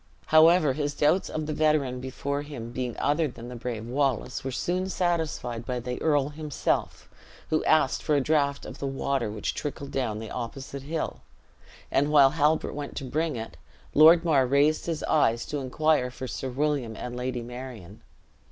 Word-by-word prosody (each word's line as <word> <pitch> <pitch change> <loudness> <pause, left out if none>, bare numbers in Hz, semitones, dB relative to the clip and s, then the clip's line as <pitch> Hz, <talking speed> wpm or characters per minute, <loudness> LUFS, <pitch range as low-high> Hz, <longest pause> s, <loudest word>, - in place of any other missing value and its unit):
However, 160 -2 +5
his 145 0 -2
doubts 155 +6 +2
of 155 0 -3
the 155 - -3
veteran 150 -5 +1
before 140 +2 -3
him 135 -6 -7
being 125 -1 -4
other 150 +2 +1
than 120 -2 -9
the 125 - -7
brave 115 -2 -5
Wallace, 130 -1 -1
were 135 - -3
soon 180 +8 -1
satisfied 160 -10 -1
by 125 0 -3
the 125 +1 -5
earl 145 -3 +2
himself, 150 -1 -2 0.4
who 155 - +2
asked 145 -4 +3
for 150 - +1
a - - +4
draught 140 0 +1
of - - -9
the 140 - -2
water 135 -3 -1
which 105 0 -3
trickled 140 -1 -5
down 120 -6 -1
the 110 0 -7
opposite 135 +3 -6
hill; 155 +3 -4 0.7
and 145 +2 +2
while 140 -3 +7
Halbert 155 +1 +1
went 145 -1 -6
to - - -4
bring 155 +3 -1
it, 115 -1 -7 0.4
Lord 165 +3 +7
Mar 140 -6 +3
raised 145 +5 +2
his 165 -2 -2
eyes 115 -6 +2
to 150 - -3
inquire 140 0 +1
for 130 +1 -7
Sir 130 - -4
William 135 -4 -1
and 125 +2 -6
Lady 125 -1 -3
Marion. 120 -5 -9
140 Hz, 180 wpm, -27 LUFS, 125-155 Hz, 0.7 s, while